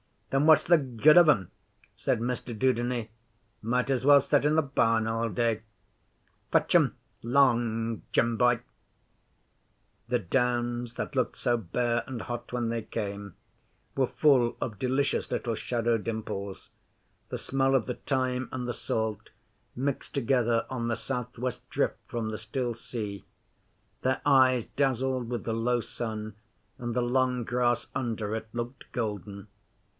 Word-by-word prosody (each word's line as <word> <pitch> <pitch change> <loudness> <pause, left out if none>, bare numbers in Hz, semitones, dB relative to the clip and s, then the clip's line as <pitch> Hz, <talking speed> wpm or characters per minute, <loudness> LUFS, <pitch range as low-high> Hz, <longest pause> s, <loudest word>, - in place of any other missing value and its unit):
'Then 135 +2 +3
what's 155 0 +6
the 170 +1 +6
good 140 +2 +4
of 175 -2 +8
'em?' 95 - +2 0.4
said - - 0
Mr 120 -1 -3
Dudeney. 120 -1 0 0.5
'Might 125 +3 0
as 130 -1 0
well 145 0 +8
set 145 +1 +2
in 150 +1 +3
the 160 - +5
barn 115 -6 +2
all 115 +1 0
day. 115 +1 0 0.9
Fetch - - +2
'em - - +4 0.3
'long, 115 -3 +2
Jim 115 -1 +2
boy!' 120 0 +3 1.5
The 125 +1 +1
Downs, 120 +2 0
that 150 - -4
looked 130 - 0
so 120 -2 +1
bare 120 +3 -1
and 125 -3 -5
hot 120 0 -6
when 120 -2 0
they 115 0 -1
came, 100 -3 -5 0.6
were 130 -2 +2
full 130 -6 +3
of 105 -5 -4
delicious 130 +2 0
little 115 - -1
shadow 115 0 0
dimples; 105 -3 -5 0.6
the - - -4
smell 135 0 +1
of 130 - +2
the 125 - -3
thyme 130 -2 -1
and 125 -1 -3
the 120 - -1
salt 110 -2 -3 0.5
mixed 135 +2 -3
together 120 -3 +2
on 120 -3 -2
the 115 - 0
south 125 -1 -5
west 125 +1 -4
drift - - 0
from 115 -2 -3
the 110 - -4
still 120 +3 -2
sea; 105 -4 -6 0.8
their 130 +1 0
eyes 130 -4 +5
dazzled 130 -2 0
with 120 -1 -3
the 115 - -2
low 120 +2 +1
sun, 110 -2 -5 0.4
and 120 -1 -3
the 125 - +2
long 125 0 +1
grass 120 +1 0
under 110 -4 -2
it 110 0 -4
looked 120 +2 -6
golden. 105 -3 -4
120 Hz, 150 wpm, -28 LUFS, 115-130 Hz, 1.5 s, of